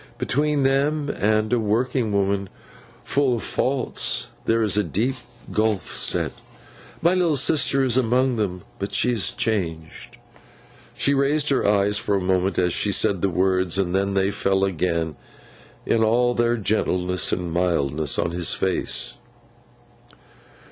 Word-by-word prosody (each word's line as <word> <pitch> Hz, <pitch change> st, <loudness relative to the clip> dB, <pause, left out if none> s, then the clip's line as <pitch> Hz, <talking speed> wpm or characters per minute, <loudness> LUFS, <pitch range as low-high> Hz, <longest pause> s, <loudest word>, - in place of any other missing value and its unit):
Between 145 Hz, +1 st, 0 dB
them, 140 Hz, +2 st, +1 dB
and 110 Hz, 0 st, 0 dB
a 120 Hz, -, +2 dB
working 115 Hz, +2 st, 0 dB
woman 100 Hz, -1 st, 0 dB, 0.5 s
fu' 140 Hz, -3 st, +1 dB
of 115 Hz, -, -4 dB
faults, 130 Hz, -1 st, -1 dB
there 115 Hz, 0 st, +2 dB
is 105 Hz, -3 st, +2 dB
a 105 Hz, -, +2 dB
deep 120 Hz, +8 st, -1 dB, 0.4 s
gulf 110 Hz, -2 st, -1 dB
set. -, -, +1 dB, 0.7 s
My 170 Hz, +2 st, +4 dB
little 175 Hz, -4 st, +1 dB
sister 135 Hz, 0 st, +2 dB
is 130 Hz, -2 st, +1 dB
among 125 Hz, 0 st, +1 dB
them, 90 Hz, -4 st, -3 dB, 0.2 s
but 100 Hz, -, -2 dB
she 125 Hz, -, +3 dB
is 115 Hz, -5 st, +2 dB
changed.' 80 Hz, -8 st, -4 dB, 0.8 s
She 140 Hz, -, +2 dB
raised 145 Hz, +2 st, +1 dB
her 135 Hz, -, +1 dB
eyes 105 Hz, 0 st, +2 dB
for 100 Hz, -, 0 dB
a -, -, +1 dB
moment 95 Hz, 0 st, 0 dB
as 90 Hz, -1 st, +1 dB
she 105 Hz, -, +1 dB
said 95 Hz, -1 st, +1 dB
the 100 Hz, -, +1 dB
words; 95 Hz, 0 st, +1 dB
and 90 Hz, -2 st, -1 dB
then 100 Hz, +1 st, 0 dB
they 95 Hz, +1 st, +1 dB
fell 95 Hz, -1 st, 0 dB
again, 85 Hz, -4 st, -1 dB, 0.7 s
in 115 Hz, -1 st, +1 dB
all 120 Hz, +2 st, +2 dB
their 120 Hz, 0 st, +1 dB
gentleness 90 Hz, -4 st, 0 dB
and 90 Hz, -2 st, -3 dB
mildness, 80 Hz, -5 st, 0 dB
on 85 Hz, -, -1 dB
his 85 Hz, -1 st, +1 dB
face. 95 Hz, -1 st, -2 dB
105 Hz, 150 wpm, -22 LUFS, 95-125 Hz, 0.8 s, My